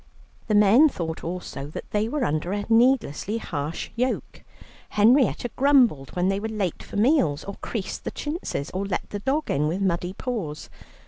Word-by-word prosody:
The 215 Hz, -, +2 dB
men 215 Hz, +9 st, +6 dB
thought 160 Hz, -, -5 dB
also 170 Hz, -5 st, -5 dB
that 150 Hz, -, -8 dB
they 210 Hz, +1 st, 0 dB
were 295 Hz, 0 st, -1 dB
under 155 Hz, +5 st, -1 dB
a 205 Hz, 0 st, -2 dB
needlessly 225 Hz, -, +2 dB
harsh 155 Hz, -6 st, -4 dB
yoke. 250 Hz, +2 st, -2 dB, 0.5 s
Henrietta 245 Hz, +2 st, +3 dB
grumbled 255 Hz, -, +3 dB
when 180 Hz, 0 st, +1 dB
they 195 Hz, +1 st, +1 dB
were 220 Hz, +2 st, -3 dB
late 205 Hz, -6 st, -2 dB
for -, -, -8 dB
meals, 205 Hz, -, +3 dB
or 200 Hz, -, -6 dB
creased 215 Hz, -5 st, -4 dB
the -, -, -3 dB
chintzes, 295 Hz, -, -4 dB
or 190 Hz, +2 st, -2 dB
let 190 Hz, -, -3 dB
the 205 Hz, -, -3 dB
dog 280 Hz, +8 st, -1 dB
in 150 Hz, +2 st, +1 dB
with 170 Hz, +5 st, -1 dB
muddy 180 Hz, -1 st, -1 dB
paws. 195 Hz, -12 st, -5 dB
205 Hz, 175 wpm, -25 LUFS, 170-245 Hz, 0.5 s, men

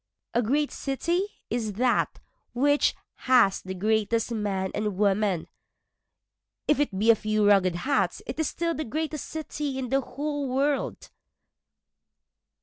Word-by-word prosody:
A 240 Hz, -, +3 dB
great 285 Hz, +6 st, +1 dB
city 340 Hz, +8 st, -1 dB, 0.2 s
is 220 Hz, -3 st, -1 dB
that 245 Hz, +4 st, +1 dB, 0.3 s
which 285 Hz, +4 st, +3 dB, 0.3 s
has 240 Hz, -7 st, +5 dB
the 190 Hz, 0 st, -6 dB
greatest 220 Hz, +3 st, +1 dB
men 200 Hz, -4 st, -1 dB
and 210 Hz, -3 st, -2 dB
women, 200 Hz, -3 st, +1 dB, 1.2 s
If 295 Hz, -, +3 dB
it 275 Hz, -10 st, 0 dB
be 220 Hz, +4 st, +5 dB
a -, -, +5 dB
few 215 Hz, 0 st, 0 dB
ragged 195 Hz, -4 st, +4 dB
huts 270 Hz, +11 st, 0 dB
it -, -, -6 dB
is 315 Hz, -, +1 dB
still 335 Hz, 0 st, -1 dB
the 310 Hz, -, -3 dB
greatest 310 Hz, +3 st, -3 dB
city 295 Hz, -3 st, -4 dB
in 255 Hz, -2 st, -3 dB
the 270 Hz, +2 st, +2 dB
whole 290 Hz, 0 st, -3 dB
world. 275 Hz, +2 st, -1 dB
245 Hz, 140 wpm, -27 LUFS, 210-290 Hz, 1.2 s, has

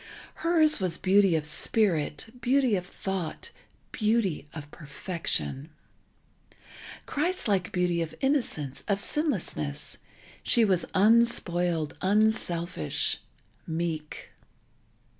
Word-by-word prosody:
Hers 320 Hz, -4 st, +4 dB
was 180 Hz, -3 st, 0 dB
beauty 195 Hz, -2 st, +4 dB
of 155 Hz, -2 st, -1 dB
spirit, 170 Hz, +3 st, 0 dB
beauty 255 Hz, -2 st, +2 dB
of 180 Hz, -, -2 dB
thought, 190 Hz, -3 st, -5 dB, 0.4 s
beauty 210 Hz, -9 st, 0 dB
of 150 Hz, -2 st, -9 dB
perfection, 145 Hz, -, -3 dB, 1.4 s
Christ 345 Hz, +3 st, -1 dB
like 195 Hz, -3 st, 0 dB
beauty 180 Hz, -1 st, 0 dB
of 160 Hz, -1 st, -4 dB
innocence, 235 Hz, -, -1 dB
of 200 Hz, -1 st, +1 dB
sinlessness; 200 Hz, -, -2 dB, 0.4 s
she 230 Hz, -, +4 dB
was 185 Hz, -4 st, +1 dB
unspoiled, 180 Hz, -7 st, +3 dB
unselfish, 185 Hz, -, +1 dB, 0.5 s
meek. 160 Hz, -2 st, -4 dB
185 Hz, 90 wpm, -27 LUFS, 160-225 Hz, 1.4 s, Hers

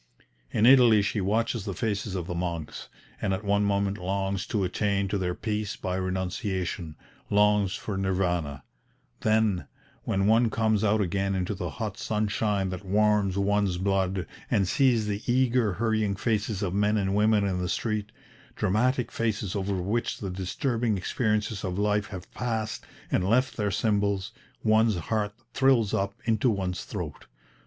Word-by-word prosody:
In 105 Hz, -, +2 dB
Italy 120 Hz, -5 st, +7 dB
she 105 Hz, +1 st, -1 dB
watches 110 Hz, +3 st, 0 dB
the 100 Hz, -, -4 dB
faces 105 Hz, -1 st, -2 dB
of 90 Hz, -3 st, -3 dB
the 90 Hz, -, -4 dB
monks, 85 Hz, -3 st, -4 dB, 0.3 s
and 95 Hz, -, +1 dB
at 95 Hz, -, -7 dB
one 100 Hz, 0 st, +2 dB
moment 100 Hz, 0 st, 0 dB
longs 95 Hz, +1 st, -2 dB
to 105 Hz, -3 st, 0 dB
attain 100 Hz, +1 st, 0 dB
to 100 Hz, -, -1 dB
their 90 Hz, -1 st, -1 dB
peace 105 Hz, -2 st, -2 dB
by 90 Hz, -2 st, -3 dB
renunciation, 95 Hz, -2 st, -3 dB, 0.3 s
longs 105 Hz, -1 st, +3 dB
for 105 Hz, -, -4 dB
Nirvana; 90 Hz, -7 st, -1 dB, 0.6 s
"then, 110 Hz, -7 st, +1 dB, 0.4 s
when 95 Hz, 0 st, 0 dB
one 115 Hz, +2 st, +4 dB
comes 110 Hz, -1 st, +1 dB
out 110 Hz, 0 st, +3 dB
again 95 Hz, +1 st, 0 dB
into 95 Hz, +2 st, -1 dB
the 90 Hz, -3 st, -4 dB
hot 110 Hz, -2 st, -5 dB
sunshine 105 Hz, -2 st, 0 dB
that 90 Hz, +2 st, -6 dB
warms 105 Hz, -1 st, +2 dB
one's 100 Hz, -2 st, +1 dB
blood, 95 Hz, -1 st, 0 dB, 0.2 s
and 100 Hz, -3 st, +2 dB
sees 120 Hz, +1 st, +3 dB
the 105 Hz, 0 st, -2 dB
eager 125 Hz, -4 st, +2 dB
hurrying 110 Hz, -1 st, 0 dB
faces 105 Hz, -1 st, -1 dB
of 90 Hz, -3 st, -1 dB
men 105 Hz, +2 st, +2 dB
and 95 Hz, -1 st, 0 dB
women 105 Hz, 0 st, +3 dB
in 95 Hz, -2 st, -1 dB
the 90 Hz, -, -2 dB
street, 105 Hz, -1 st, -2 dB, 0.4 s
dramatic 125 Hz, +6 st, +1 dB
faces 110 Hz, -4 st, -2 dB
over 100 Hz, 0 st, -1 dB
which 100 Hz, +6 st, -1 dB
the 95 Hz, -3 st, -5 dB
disturbing 110 Hz, +4 st, -1 dB
experiences 105 Hz, +1 st, -1 dB
of 90 Hz, -2 st, -3 dB
life 105 Hz, +1 st, +1 dB
have 95 Hz, -4 st, -9 dB
passed 110 Hz, -3 st, -3 dB, 0.3 s
and -, -, +2 dB
left 125 Hz, +3 st, +2 dB
their 105 Hz, -2 st, 0 dB
symbols, 100 Hz, -1 st, 0 dB, 0.3 s
one's 110 Hz, 0 st, +4 dB
heart 105 Hz, +4 st, -2 dB, 0.2 s
thrills 130 Hz, -6 st, +3 dB
up 100 Hz, +1 st, 0 dB
into 115 Hz, +2 st, +2 dB
one's 95 Hz, -4 st, -2 dB
throat. 85 Hz, -, -6 dB
100 Hz, 160 wpm, -27 LUFS, 95-110 Hz, 0.6 s, Italy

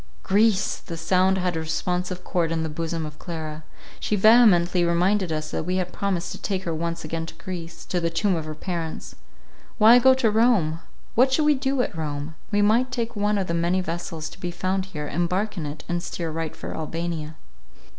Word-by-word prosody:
Greece! 210 Hz, 0 st, +2 dB
The 165 Hz, -, -8 dB
sound 185 Hz, +3 st, +2 dB
had 180 Hz, -2 st, 0 dB
a -, -, -1 dB
responsive 180 Hz, +3 st, -2 dB
chord 170 Hz, -4 st, 0 dB
in 165 Hz, -1 st, 0 dB
the 160 Hz, -, -2 dB
bosom 165 Hz, +1 st, -3 dB
of 150 Hz, 0 st, -9 dB
Clara. 155 Hz, -2 st, -6 dB, 0.4 s
She 210 Hz, -, 0 dB
vehemently 190 Hz, -5 st, +5 dB
reminded 180 Hz, +2 st, +2 dB
us 155 Hz, 0 st, -3 dB
that -, -, -2 dB
we 180 Hz, +3 st, -1 dB
had 180 Hz, -1 st, -2 dB
promised 180 Hz, -4 st, -2 dB
to -, -, -7 dB
take 190 Hz, -2 st, -2 dB
her 170 Hz, -, -2 dB
once 170 Hz, +1 st, -3 dB
again 165 Hz, +1 st, -3 dB
to -, -, -9 dB
Greece, 170 Hz, -3 st, -7 dB
to 180 Hz, -, -1 dB
the 170 Hz, -1 st, 0 dB
tomb 185 Hz, +3 st, +1 dB
of 160 Hz, -2 st, -3 dB
her 155 Hz, 0 st, -6 dB
parents. 165 Hz, 0 st, -5 dB, 0.6 s
Why 230 Hz, +2 st, +8 dB
go 260 Hz, +1 st, +6 dB
to 245 Hz, -5 st, +2 dB
Rome? 210 Hz, -9 st, +3 dB, 0.3 s
what 255 Hz, +3 st, +4 dB
should 300 Hz, +3 st, +2 dB
we 300 Hz, -, +6 dB
do 270 Hz, -1 st, 0 dB
at -, -, -5 dB
Rome? 150 Hz, -1 st, -4 dB, 0.2 s
We 205 Hz, 0 st, +3 dB
might 235 Hz, +5 st, +3 dB
take 235 Hz, -2 st, -3 dB
one 205 Hz, 0 st, +1 dB
of 195 Hz, -, 0 dB
the 170 Hz, -, -3 dB
many 170 Hz, +2 st, +1 dB
vessels 165 Hz, -2 st, -4 dB
to -, -, -14 dB
be 180 Hz, -, -3 dB
found 185 Hz, +2 st, -1 dB
here, 150 Hz, -5 st, -5 dB
embark 180 Hz, +7 st, -1 dB
in 160 Hz, -5 st, -4 dB
it, 145 Hz, +1 st, -7 dB
and 175 Hz, -1 st, -1 dB
steer 170 Hz, -1 st, -4 dB
right 160 Hz, 0 st, -4 dB
for -, -, -6 dB
Albania. 160 Hz, 0 st, -4 dB
175 Hz, 210 wpm, -24 LUFS, 165-205 Hz, 0.6 s, Why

